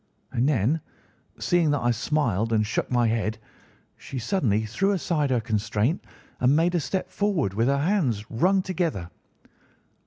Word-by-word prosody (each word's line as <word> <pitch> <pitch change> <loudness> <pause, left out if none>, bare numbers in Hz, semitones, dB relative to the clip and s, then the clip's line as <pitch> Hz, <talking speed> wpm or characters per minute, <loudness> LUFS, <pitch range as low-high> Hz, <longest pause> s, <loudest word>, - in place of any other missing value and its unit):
And 125 +5 +1
then, 145 +4 +1 0.6
seeing 175 -3 +2
that 145 -1 +1
I 120 - +2
smiled 115 -3 0
and 110 -1 +2
shook 105 - -2
my 120 -1 +2
head, 110 -1 -1 0.6
she 135 - -8
suddenly 115 - 0
threw 190 - 0
aside 160 -6 0
her 125 -2 +2
constraint 110 - -1 0.4
and 130 +3 +4
made 170 +3 +2
a 175 - +2
step 185 +4 -3
forward, 190 - 0
with 115 +4 +1
her 140 +1 +2
hands 140 - 0
wrung 185 +11 +2
together. 160 - -2
130 Hz, 155 wpm, -25 LUFS, 110-170 Hz, 0.6 s, and